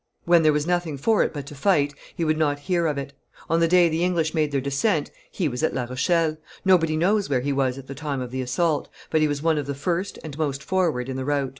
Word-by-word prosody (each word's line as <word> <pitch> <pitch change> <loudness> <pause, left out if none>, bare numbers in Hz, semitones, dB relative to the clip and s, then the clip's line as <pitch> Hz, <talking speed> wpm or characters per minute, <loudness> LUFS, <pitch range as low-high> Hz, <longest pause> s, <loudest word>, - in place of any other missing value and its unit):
When 170 -1 +5
there 155 -1 +5
was 150 0 0
nothing 175 -4 -1
for 220 +10 +2
it - - +1
but 145 -3 -6
to 145 - -9
fight, 145 -2 +2 0.2
he 165 - -1
would 155 0 +2
not 145 -2 +1
hear 170 0 +1
of 150 -2 -1
it. 140 0 -5 0.4
On 165 - +3
the 165 - +4
day 175 0 +5
the 165 +1 0
English 170 -3 +1
made 155 -3 +1
their 140 - +1
descent, 140 - 0 0.2
he 180 - -1
was 125 -1 -3
at 160 - 0
La 125 - 0
Rochelle; 155 +6 0 0.3
nobody 165 -4 +4
knows 195 +4 +2
where 130 -3 +1
he 140 +2 -1
was 135 -2 0
at 135 - -9
the 135 - -7
time 140 0 -4
of 125 -1 -5
the 130 0 -3
assault, 145 +5 0 0.2
but 155 - +3
he 155 - +4
was 145 0 -3
one 160 -2 +2
of 140 - -4
the 140 - -3
first 175 +7 -2
and 155 -3 -7
most 140 -3 -1
forward 165 -9 0
in 130 -1 -4
the 130 - -3
rout." 140 -2 0
150 Hz, 270 wpm, -24 LUFS, 140-170 Hz, 0.4 s, When